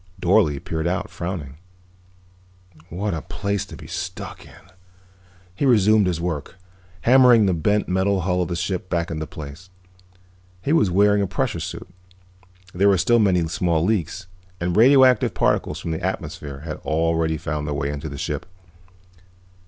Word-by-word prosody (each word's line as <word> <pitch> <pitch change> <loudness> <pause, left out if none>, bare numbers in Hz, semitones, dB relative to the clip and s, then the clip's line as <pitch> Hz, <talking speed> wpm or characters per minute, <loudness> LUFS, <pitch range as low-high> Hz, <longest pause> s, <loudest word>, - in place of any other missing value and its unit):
Dorle 85 -6 +3
peered 80 +3 -3
out, 100 +3 -2
frowning. 85 -6 -5 1.3
"What 100 +4 -3
a 80 - -3
place 100 +2 -3
to - - -10
be - - -12
stuck - - -6
in." - - -16 0.9
He 95 - -4
resumed 110 -5 +4
his 85 -3 -1
work, 85 -1 -4 0.5
hammering 125 -3 +6
the 95 - +2
bent 105 +6 +1
metal 95 +1 +1
hull 90 0 0
of 90 - -1
the 85 - -3
ship 90 +1 -3
back 85 -1 -1
into 80 -1 -4
place. 80 +5 -10 0.9
He 145 - +1
was 160 - +3
wearing 100 +3 +3
a 100 - 0
pressure 110 0 -2
suit; 85 +3 -6 0.9
there 100 +3 +3
were 100 - +4
still 120 +7 +3
many 90 -6 +2
small 85 0 0
leaks, 95 -3 -1 0.3
and 85 0 -1
radioactive 130 +1 +5
particles 75 - 0
from 85 -3 -4
the 80 - -3
atmosphere 70 -2 -5
had 75 -1 -6
already 80 0 0
found 75 -1 -4
their 75 - -2
way 70 +1 -2
into 75 +2 -5
the 70 - -7
ship. - - -4
90 Hz, 160 wpm, -22 LUFS, 80-100 Hz, 1.3 s, hammering